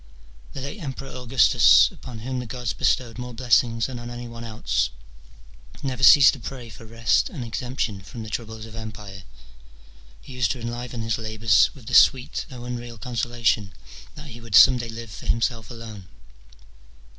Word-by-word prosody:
The 135 - -6
late 140 +10 -6
Emperor 135 -2 -6
Augustus, 125 - +4
upon 120 -3 -10
whom 130 +2 -4
the 125 - -6
gods 120 -4 -4
bestowed 120 +4 0
more 125 -1 -7
blessings 115 -1 +2
than 130 -2 -6
on 120 0 -8
any 120 0 -7
one 115 0 -9
else, 110 -2 -1 0.9
never 130 -2 -3
ceased 135 -5 +8
to - - -8
pray 125 -4 -8
for 110 +2 -13
rest 115 +1 +1
and 130 -8 -6
exemption 120 -4 -3
from 115 +4 -9
the 110 - -8
troubles 110 -1 -5
of 110 0 -12
empire: 105 -3 -8 1.0
he 130 - -13
used 125 -5 0
to 125 - -10
enliven 120 0 -5
his 110 -1 -1
labours 110 -2 +3
with 130 -5 -15
this 115 0 +7
sweet, 130 +4 +1
though 125 -3 -9
unreal 120 -1 -6
consolation, 115 -3 -1 0.4
that 150 0 -10
he 120 -1 -11
would 115 -3 -3
some 125 - +8
day 120 -1 -5
live 115 -1 -8
for - - -10
himself 115 -2 -1
alone. 110 -5 -10
115 Hz, 175 wpm, -24 LUFS, 110-125 Hz, 1.0 s, ceased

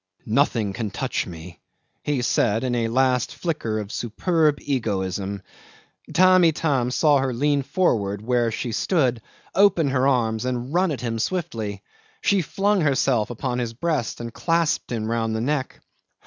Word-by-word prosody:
"Nothing 115 -4 +1
can 110 0 -3
touch - - -2
me," 85 0 -10 0.4
he 140 -4 -1
said 115 -2 +1
in 125 -1 -1
a 115 -2 0
last 125 +1 +1
flicker 150 -11 -2
of 105 -1 -5
superb 150 - +1
egoism. 100 -6 -2 0.7
Tamb' 185 0 +5
Itam 145 -6 +1
saw 145 +2 +3
her 135 -1 0
lean 145 +3 +1
forward 105 - 0
where 120 0 +1
she 120 +2 -3
stood, 125 - +1 0.3
open 180 -7 +4
her 130 0 +2
arms, 115 -5 +1
and 125 +2 -3
run 185 +1 +3
at 145 - -3
him 115 -2 -2
swiftly. 110 - -3 0.4
She 200 -2 +3
flung 200 +4 +1
herself 135 -6 +2
upon 125 +1 -3
his 120 -2 -3
breast 150 -2 -2
and 115 -1 -6
clasped 165 -2 0
him 110 -2 -2
round 115 0 -1
the 110 - -1
neck. 135 +1 -2
125 Hz, 155 wpm, -23 LUFS, 110-150 Hz, 0.7 s, Tamb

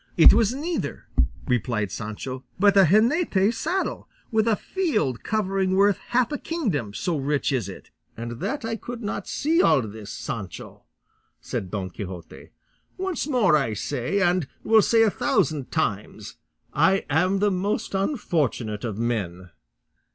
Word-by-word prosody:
"It 165 - +9
was 225 0 +3
neither," 315 +6 -3 0.4
replied 115 -5 0
Sancho, 115 +5 -6
"but 200 +1 +4
a 195 -1 +7
jineta 215 - +3
saddle, 375 +10 -2 0.2
with 220 0 +2
a 225 - +4
field 215 - -1
covering 195 -3 0
worth 200 0 +4
half 245 +1 +1
a 295 - -2
kingdom, 195 - -2
so 175 -3 -1
rich 145 +1 0
is 120 -8 -1
it." 95 - -11 0.3
"And 120 +1 -6
that 280 -3 -3
I 225 0 -2
could 240 +1 -7
not 200 -1 -4
see 325 +4 +2
all - - +5
this, 105 -1 -8
Sancho!" 95 -5 -7 0.5
said 95 - -4
Don 95 -3 -4
Quixote; 90 -3 -8 0.5
"once 375 -5 -2
more 235 - +4
I 135 -8 0
say, 135 - -2
and 175 -5 +2 0.2
will 220 0 +5
say 225 +2 +4
a 220 - +3
thousand 150 -8 0
times, 110 -11 -3 0.4
I 190 +7 +3
am 180 +7 +2
the 205 +1 +2
most 200 +4 -2
unfortunate 155 - -1
of 110 -4 -3
men." 95 -7 -3
185 Hz, 150 wpm, -24 LUFS, -, 0.5 s, It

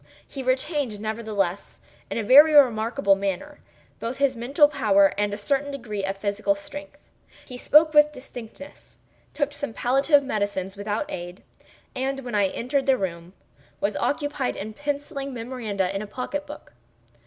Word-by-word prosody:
He 275 - -7
retained, 260 -3 -1
nevertheless, 215 -4 -3 0.3
in - - -3
a 225 - -1
very 290 +7 +7
remarkable 235 -4 +4
manner, 200 +9 -4 0.4
both 235 +3 -4
his 275 -1 +2
mental 275 +6 +4
power 210 -9 +3
and 205 0 0
a 205 - -4
certain 285 0 -1
degree 235 -8 -5
of 195 0 -2
physical 200 0 0
strength. 290 +9 -10 0.5
He 250 - -9
spoke 305 +5 +4
with 300 0 +6
distinctness—took 280 +3 -8
some 285 -4 -4
palliative 275 +3 +3
medicines 205 -6 -2
without 205 +5 -3
aid—and, 255 +9 -7
when 245 -3 -7
I 205 -2 +3
entered 265 +8 -2
the 265 -1 +4
room, 170 -2 -5 0.5
was 200 0 -1
occupied 290 -3 -1
in 215 +2 -6
penciling 280 0 -4
memoranda 220 -6 -3
in 195 - -2
a 215 - -6
pocket 275 +6 -5
book. 295 - -11
245 Hz, 145 wpm, -24 LUFS, 205-280 Hz, 0.5 s, very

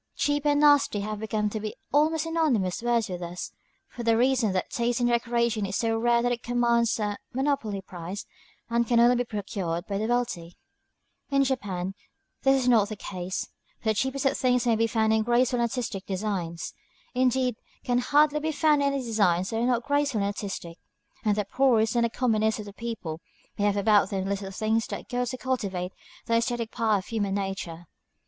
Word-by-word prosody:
"Cheap" 290 0 0
and 290 0 +3
"nasty" 290 -8 +4
have 215 +1 -4
come 210 -1 +1
to 215 - -3
be 215 0 -5 0.2
almost 310 +2 +3
synonymous 290 - 0
words 235 -2 +1
with 180 -1 -5
us, 175 +1 -5 0.4
for 240 - -8
the 230 -1 +3
reason 250 -3 +3
that 185 -1 -2
taste 235 0 0
in 245 - +2
decoration 235 -2 +1
is 195 - -4
so 225 +1 +1
rare 235 +1 +2
that 245 - +1
it 240 -1 -2
commands 235 -1 +2
a 205 -1 -2
monopoly 260 -7 -1
price, 180 +2 -7 0.4
and 235 0 +1
can 235 0 +3
only 240 +1 +6
be 245 - +1
procured 195 -6 -3
by 200 -1 -3
the 220 - -1
wealthy. 210 -9 -2 0.7
In 275 -1 +3
Japan 195 -8 -2 0.5
this 270 0 +4
is - - -1
not 220 -5 +4
the 215 - -4
case, 185 -2 -5 0.3
for 220 - -2
the - - +4
cheapest 265 +5 -1
of 270 - +3
things 250 -1 +2
may 235 -2 +3
be 225 +1 +2
found 220 -1 +2
in 220 - +3
graceful 240 +2 +2
and 235 0 +2
artistic 225 -6 -4
designs, 185 -4 -3 0.4
indeed 255 -1 +1 0.3
can 245 0 +1
hardly 295 +3 +3
be 315 +1 -1
found 305 -1 +3
in 280 0 +2
any 275 -1 -2
designs 195 -5 +1
that 225 - -1
are 240 - +2
not 245 -1 +1
graceful 285 -6 +1
and - - +1
artistic; 195 -4 -5 0.4
and 210 -2 +2
the 210 - 0
poorest 225 -1 +2
and 235 -1 +2
commonest 220 -3 +1
of 210 - -6
the 200 - -10
people 195 -8 -5 0.4
may 205 - +2
have 205 0 +2
about 205 0 +4
them 190 -1 -2
the 195 - -2
little 200 -1 -3
things 220 +3 0
that - - -6
go 250 0 -1
to 255 +1 -4
cultivate 200 -9 -2 0.3
the 230 - -1
æsthetic 230 0 0
part 215 -4 +1
of - - -18
human 205 -4 -1
nature. 195 -4 -4
230 Hz, 200 wpm, -27 LUFS, 200-250 Hz, 0.7 s, only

